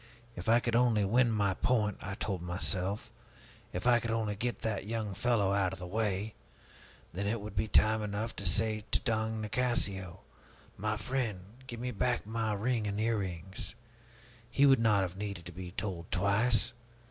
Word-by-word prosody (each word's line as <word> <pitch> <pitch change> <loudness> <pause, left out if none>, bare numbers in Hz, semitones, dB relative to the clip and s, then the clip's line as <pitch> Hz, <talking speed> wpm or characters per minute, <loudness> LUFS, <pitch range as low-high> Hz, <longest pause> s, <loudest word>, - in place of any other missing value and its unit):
If 90 +4 -4
I 115 +1 +6
could 120 -1 -1
only 115 -4 +4
win 120 +4 +4
my 100 -3 +2
point, 105 0 +1
I 100 0 -4
told 95 -4 -2
myself, 90 +3 -2 0.6
if 90 - -4
I 120 -1 +6
could 115 - -4
only 110 -2 0
get 120 +3 -2
that 105 -3 -2
young 110 -2 -2
fellow 105 -4 +2
out 95 -2 +1
of - - -6
the 90 - -7
way, 105 +1 -1 0.8
then 100 +3 -2
it 115 +2 0
would 105 0 -8
be 110 +3 +1
time 110 0 +4
enough 105 +2 -3
to 100 - -4
say 110 +3 +2
to - - +2
Don 110 -1 0
Nicasio, 100 -6 -1 0.5
'My 105 +1 -1
friend, 115 -4 -2 0.3
give 120 -2 -6
me 125 +1 -2
back 125 +1 0
my 110 0 -1
ring 110 +1 0
and 100 0 -2
my 110 - 0
earrings!' 95 -2 -2 0.7
He 140 +3 +4
would 135 -3 +6
not 110 -3 +4
have 90 0 -4
needed 100 -4 -5
to 85 - -7
be 90 +1 -7
told 90 -2 -4
twice. 110 +5 +2
105 Hz, 180 wpm, -32 LUFS, 95-115 Hz, 0.8 s, I